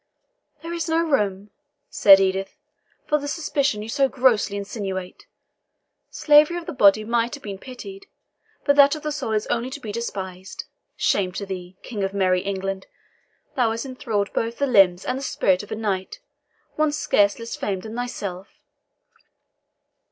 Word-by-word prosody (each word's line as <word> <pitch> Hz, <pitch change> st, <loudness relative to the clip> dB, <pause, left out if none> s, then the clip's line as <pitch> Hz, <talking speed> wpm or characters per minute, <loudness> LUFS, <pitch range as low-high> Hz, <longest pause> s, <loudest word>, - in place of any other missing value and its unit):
"There 335 Hz, +1 st, -5 dB
is 335 Hz, -2 st, -3 dB
no 320 Hz, -, +2 dB
room," 205 Hz, -, -1 dB, 0.4 s
said 195 Hz, -1 st, +7 dB
Edith, 190 Hz, 0 st, -1 dB, 0.5 s
"for 300 Hz, -, +1 dB
the 285 Hz, -, -6 dB
suspicion 290 Hz, -7 st, -1 dB
you 220 Hz, -, -8 dB
so 275 Hz, +2 st, +2 dB
grossly 240 Hz, -6 st, +2 dB
insinuate. 195 Hz, -3 st, -5 dB, 0.8 s
Slavery 300 Hz, +3 st, +4 dB
of 345 Hz, -, -6 dB
the -, -, -5 dB
body 215 Hz, -4 st, +5 dB
might 235 Hz, +3 st, 0 dB
have 285 Hz, -, -14 dB
been 200 Hz, -2 st, -6 dB
pitied, 390 Hz, -, -10 dB, 0.6 s
but 285 Hz, -, +4 dB
that 280 Hz, +1 st, +7 dB
of 305 Hz, -, -9 dB
the 305 Hz, -, -2 dB
soul 260 Hz, -7 st, -3 dB
is 215 Hz, 0 st, 0 dB
only 240 Hz, +2 st, -1 dB
to 275 Hz, -, -7 dB
be 220 Hz, -6 st, -6 dB
despised. 190 Hz, -4 st, -6 dB, 0.3 s
Shame 185 Hz, -2 st, +1 dB
to 200 Hz, -, -4 dB
thee, 185 Hz, -1 st, -7 dB
King 210 Hz, -5 st, -4 dB
of 195 Hz, +1 st, -2 dB
merry 185 Hz, -2 st, +2 dB
England. 195 Hz, 0 st, -4 dB, 0.7 s
Thou 245 Hz, -4 st, +2 dB
hast 225 Hz, +2 st, -3 dB
enthralled 225 Hz, -6 st, -3 dB
both 230 Hz, +1 st, -2 dB
the 280 Hz, -, +1 dB
limbs 195 Hz, -8 st, +4 dB
and 255 Hz, +1 st, -2 dB
the -, -, -8 dB
spirit 190 Hz, -8 st, +1 dB
of 205 Hz, -, -13 dB
a -, -, -1 dB
knight, 200 Hz, -, -3 dB, 0.6 s
one 310 Hz, -1 st, +2 dB
scarce 205 Hz, -8 st, +2 dB
less 230 Hz, 0 st, -6 dB
famed 190 Hz, -2 st, -3 dB
than 220 Hz, 0 st, -7 dB
thyself." 200 Hz, -6 st, -5 dB
220 Hz, 165 wpm, -23 LUFS, 195-275 Hz, 0.8 s, said